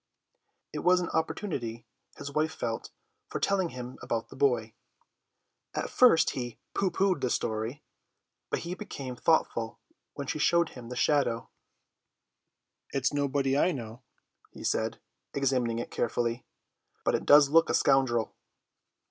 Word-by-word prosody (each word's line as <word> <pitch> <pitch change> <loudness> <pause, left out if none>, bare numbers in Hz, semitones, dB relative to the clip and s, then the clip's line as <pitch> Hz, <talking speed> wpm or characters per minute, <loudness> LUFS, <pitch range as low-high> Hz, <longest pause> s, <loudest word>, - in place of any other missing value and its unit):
It 150 - -3
was 180 +3 +4
an 175 - -2
opportunity, 135 - -2 0.3
his 140 - -6
wife 155 +2 0
felt, 115 -1 -3 0.4
for - - -4
telling 190 -3 +1
him 125 -1 -8
about 115 -1 -2
the - - -11
boy. 120 -5 +1 1.0
At - - -2
first 245 -10 +6
he 120 -2 -5 0.2
pooh 195 - +1
poohed 190 -5 +1
the 125 - +1
story, 110 +5 -2 0.7
but - - -1
he 170 +1 -4
became 140 - -6
thoughtful 120 -6 +1 0.4
when 140 - -4
she 155 - -3
showed 170 +1 +3
him 120 -2 -10
the 125 - -5
shadow. 125 -3 +1 1.4
"It 135 - -2
is 130 - +2
nobody 140 -1 +1
I 175 +5 +3
know," 115 -3 -7 0.5
he - - -11
said, 110 0 0 0.4
examining 130 -4 +1
it 120 - -4
carefully, 120 +1 -1 0.6
"but - - +3
it - - -1
does 145 -1 +8
look 165 +1 +5
a - - +2
scoundrel." 125 -4 +2
135 Hz, 145 wpm, -29 LUFS, 120-160 Hz, 1.4 s, does